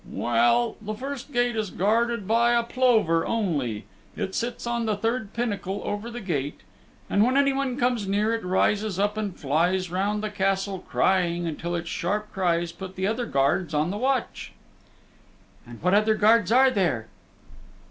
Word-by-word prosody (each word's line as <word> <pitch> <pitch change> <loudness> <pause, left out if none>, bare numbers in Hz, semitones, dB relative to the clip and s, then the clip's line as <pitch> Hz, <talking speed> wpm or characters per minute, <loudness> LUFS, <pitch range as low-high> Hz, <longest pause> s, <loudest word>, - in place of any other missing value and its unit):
"Well, 120 0 +2
the 215 0 -5
first 275 +3 -6
gate 245 -2 +1
is 215 -3 -2
guarded 225 +2 0
by 235 +2 +3
a 235 0 +3
plover 230 -9 +2
only. 145 - -1 0.3
It 190 - -4
sits 235 0 -3
on 235 -1 -1
the 215 - +1
third 225 0 -2
pinnacle 205 -4 -3
over 205 +3 -3
the 240 0 -7
gate, 150 -7 -3 0.5
and 200 - +3
when 255 +4 +2
anyone 275 -2 +1
comes 245 -5 0
near 210 +3 +1
it 230 - -2
rises 195 +2 +1
up 205 +1 +1
and 210 -4 -4
flies 175 +6 0
round 205 +3 -1
the 215 - -3
Castle 195 -1 -1
crying 175 -2 +1
until 170 +2 -3
its 170 0 -4
sharp 210 +4 -2
cries 175 -3 0
put 190 +1 -9
the 190 - -2
other 230 +4 -1
guards 145 +4 +1
on 155 +4 +1
the - - -4
watch." 260 +1 -2 1.1
"And 120 -1 -11
what 180 +1 +3
other 215 +1 +4
guards 220 +1 +4
are 260 +2 +6
there?" 170 - 0
205 Hz, 170 wpm, -25 LUFS, 175-230 Hz, 1.1 s, are